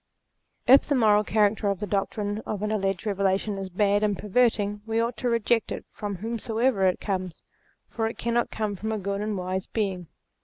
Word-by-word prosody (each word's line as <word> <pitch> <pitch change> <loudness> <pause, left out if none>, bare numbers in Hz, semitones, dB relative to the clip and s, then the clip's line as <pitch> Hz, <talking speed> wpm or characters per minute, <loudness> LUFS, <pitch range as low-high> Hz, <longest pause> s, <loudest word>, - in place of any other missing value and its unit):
If 265 +3 +7
the 285 - +2
moral 210 -4 +4
character 210 0 +2
of 200 -2 0
the - - -2
doctrines 205 +1 -2
of 210 -1 -3
an 210 - -1
alleged 195 -2 -1
Eevelation 200 0 0
is 190 -1 -5
bad 205 +2 +2
and 205 -2 +1
perverting, 210 -1 +1
we 225 0 0
ought 230 +1 0
to 245 - -1
reject 230 0 +1
it - - -5
from 205 -1 -5
whomsoever 225 +1 0
it 185 - +1
comes; 185 -4 -4 0.4
for 225 -1 -2
it 225 - -6
cannot 235 0 0
come 215 -2 -2
from 220 +3 -4
a 220 - -1
good 200 0 -3
and 210 -1 -2
wise 185 +1 -3
Being. 190 -6 -2
210 Hz, 195 wpm, -26 LUFS, 195-225 Hz, 0.4 s, If